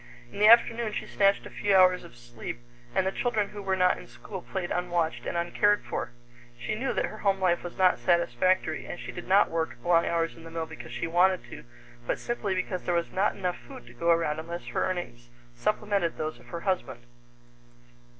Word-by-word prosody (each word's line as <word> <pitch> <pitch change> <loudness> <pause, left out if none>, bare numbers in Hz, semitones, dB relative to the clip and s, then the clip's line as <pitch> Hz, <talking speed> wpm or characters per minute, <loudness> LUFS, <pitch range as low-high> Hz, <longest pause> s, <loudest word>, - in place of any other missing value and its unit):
In - - -7
the 210 - +6
afternoon 230 -1 +5
she - - -3
snatched 200 0 +2
a - - -9
few 205 -1 +1
hours 185 -1 +5
of 120 - -14
sleep, 120 -1 -7 0.4
and 190 - +2
the 190 - +1
children 215 -2 0
who 205 - -8
were 190 -1 0
not 180 -1 +3
in - - -12
school 120 - -9
played 180 -1 -4
unwatched 175 -2 -1
and - - -2
uncared 205 +4 +2
for. - - -3 0.5
She 120 - -3
knew 255 +5 -1
that - - 0
her 215 - -8
home 195 -1 +1
life 180 -2 +2
was 175 - -7
not 185 -1 +4
satisfactory, 175 +1 +1
and 175 - -6
she - - -6
did 175 - -8
not 195 +2 +4
work 165 -6 -2
long 170 -1 +3
hours 165 -1 0
in 165 - -13
the 165 - -9
mill 165 0 -3
because - - -10
she - - -3
wanted 180 +2 +3
to, - - -9 0.4
but - - 0
simply 210 -5 -2
because 185 0 -2
there 175 - -1
was 170 0 -1
not 195 +3 +1
enough 180 -3 -2
food 120 - -11
to 120 - -14
go 170 +8 -1
around 165 -2 +2
unless 170 -3 -6
her - - 0
earnings 120 -10 -5 0.2
supplemented 200 - 0
those 155 0 -4
of - - -18
her 170 -1 -6
husband. 185 - -2
180 Hz, 215 wpm, -28 LUFS, 165-195 Hz, 0.5 s, the